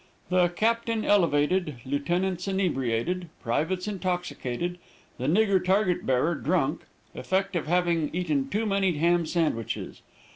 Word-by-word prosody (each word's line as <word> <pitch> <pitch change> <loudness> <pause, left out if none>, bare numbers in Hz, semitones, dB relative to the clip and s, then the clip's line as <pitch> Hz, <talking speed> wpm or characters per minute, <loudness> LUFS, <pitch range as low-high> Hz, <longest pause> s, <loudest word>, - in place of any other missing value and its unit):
The 180 -1 +4
captain 225 +4 0
elevated, 170 -3 +2
lieutenants 175 +7 -1
inebriated, 175 -2 -1
privates 180 - -1
intoxicated, 180 -5 -3 0.4
the 130 - -2
nigger 195 +3 +3
target 190 -1 +1
bearer 130 +6 +2
drunk 155 -1 0 0.3
effect 195 0 -1
of 165 - -1
having 170 -2 +1
eaten 155 -6 -1
too 215 +3 -1
many 195 -3 +1
ham 170 +2 +2
sandwiches. 155 - -2
175 Hz, 115 wpm, -27 LUFS, 150-190 Hz, 0.4 s, The